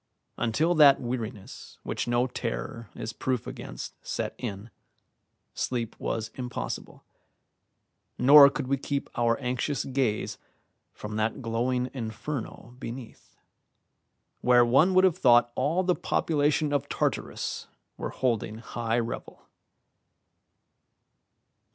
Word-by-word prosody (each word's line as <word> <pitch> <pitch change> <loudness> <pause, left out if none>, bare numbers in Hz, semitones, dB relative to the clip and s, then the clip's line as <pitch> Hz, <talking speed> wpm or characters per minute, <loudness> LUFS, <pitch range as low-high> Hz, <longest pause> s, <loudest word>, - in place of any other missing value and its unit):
Until 120 +9 +1
that 145 -4 +7
weariness 120 -4 -6
which - - -3
no 120 +1 +2
terror 105 - -5
is 110 - -5
proof 125 0 -2
against - - -7
set - - -3
in, 105 -1 -6 0.8
sleep 120 -3 -2
was 110 -1 -3
impossible, 125 - -5 1.1
nor 140 +1 +9
could 140 0 -4
we 135 +2 0
keep 140 +1 -3
our 115 -1 +2
anxious 130 +2 -2
gaze 130 -5 -1 0.5
from 105 0 -6
that 110 +4 -1
glowing 125 +2 -1
inferno 120 0 -5
beneath, 120 -1 -9 1.0
where 120 -1 +5
one 155 +10 +4
would 185 - +6
have 185 -4 +3
thought 120 -1 +5
all 155 +10 +1
the 180 0 +3
population 150 -2 +1
of 145 0 -1
Tartarus - - -2 0.3
were - - -4
holding 115 -4 -1
high 115 0 -2
revel. 115 -1 -4
125 Hz, 110 wpm, -27 LUFS, 115-140 Hz, 1.1 s, nor